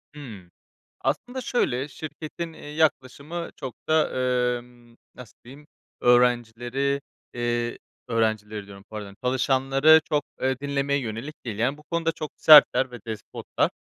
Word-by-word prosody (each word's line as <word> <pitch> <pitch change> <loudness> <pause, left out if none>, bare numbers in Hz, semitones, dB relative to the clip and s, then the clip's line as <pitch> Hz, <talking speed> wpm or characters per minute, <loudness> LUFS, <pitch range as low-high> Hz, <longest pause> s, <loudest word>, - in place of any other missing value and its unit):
Hımm. 105 -11 -10 0.5
Aslında, 250 +3 -2
şöyle, 135 - 0
şirketin, 160 +2 -7
eee, - - -13
yaklaşımı 150 +2 -1
çok 130 -4 -6
da, 155 0 +3 0.5
emm, 120 -1 -19 0.2
nasıl 125 -3 -13
diyeyim, 140 +5 -14 0.3
öğrencileri, 125 +3 +2 0.3
eee, 120 0 -1 0.3
öğrencileri 110 -3 -1
diyorum 100 -1 -12
pardon 105 -2 -8
çalışanları 135 +4 +4
çok, 145 -2 +1 0.2
eee, 130 0 0
dinlemeye 140 0 0
yönelik 120 +5 -6
değil. 110 -3 -4
Yani 135 +5 +1
bu 150 - -17
konuda 165 +1 -1
çok 155 -2 -6
sertler 145 -4 +7
ve 120 - -8
despotlar. 110 -1 -2
130 Hz, 125 wpm, -25 LUFS, 120-150 Hz, 0.5 s, sertler